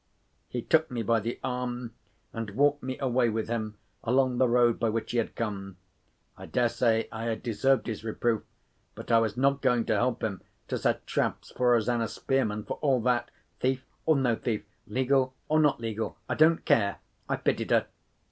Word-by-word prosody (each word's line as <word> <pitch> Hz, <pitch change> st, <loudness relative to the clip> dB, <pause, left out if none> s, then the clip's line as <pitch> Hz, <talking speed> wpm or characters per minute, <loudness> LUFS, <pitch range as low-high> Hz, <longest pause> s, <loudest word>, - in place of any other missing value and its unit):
He 120 Hz, -2 st, -3 dB
took 160 Hz, 0 st, +3 dB
me 120 Hz, -3 st, -3 dB
by 115 Hz, +1 st, +2 dB
the 115 Hz, +3 st, -4 dB
arm, 125 Hz, -2 st, -3 dB, 0.4 s
and 115 Hz, -2 st, -4 dB
walked 145 Hz, +2 st, +3 dB
me 130 Hz, 0 st, -4 dB
away 125 Hz, -3 st, +2 dB
with 110 Hz, 0 st, -2 dB
him 110 Hz, -2 st, -3 dB, 0.3 s
along 125 Hz, +1 st, +2 dB
the 130 Hz, -, +5 dB
road 120 Hz, -1 st, +3 dB
by 115 Hz, -, +1 dB
which 110 Hz, 0 st, -2 dB
he 120 Hz, -, +1 dB
had 115 Hz, -, -2 dB
come. 100 Hz, -4 st, -4 dB, 0.6 s
I -, -, -10 dB
dare 120 Hz, -1 st, +2 dB
say 115 Hz, -1 st, +1 dB
I 110 Hz, +1 st, -5 dB
had 115 Hz, -2 st, -2 dB
deserved 125 Hz, +4 st, +2 dB
his 110 Hz, -3 st, -4 dB
reproof—but 115 Hz, +1 st, -4 dB
I 115 Hz, -, +6 dB
was 110 Hz, 0 st, -1 dB
not 140 Hz, +1 st, +2 dB
going 125 Hz, -3 st, +2 dB
to -, -, +1 dB
help 125 Hz, 0 st, 0 dB
him 100 Hz, -4 st, -2 dB, 0.3 s
to -, -, -1 dB
set -, -, 0 dB
traps -, -, -2 dB
for 125 Hz, -1 st, +3 dB
Rosanna 115 Hz, 0 st, +1 dB
Spearman, 110 Hz, -6 st, -1 dB
for -, -, -5 dB
all 135 Hz, -4 st, +3 dB
that. 120 Hz, 0 st, +1 dB, 0.3 s
Thief 130 Hz, 0 st, 0 dB, 0.2 s
or 160 Hz, -, +5 dB
no 130 Hz, -4 st, +2 dB
thief, 110 Hz, -2 st, -2 dB, 0.2 s
legal 130 Hz, 0 st, +1 dB
or 155 Hz, +1 st, +3 dB
not 150 Hz, -5 st, +3 dB
legal, 115 Hz, -1 st, -3 dB
I -, -, -1 dB
don't 160 Hz, +2 st, +4 dB
care—I 100 Hz, -3 st, 0 dB
pitied -, -, -1 dB
her. -, -, +3 dB
120 Hz, 185 wpm, -28 LUFS, 115-130 Hz, 0.6 s, I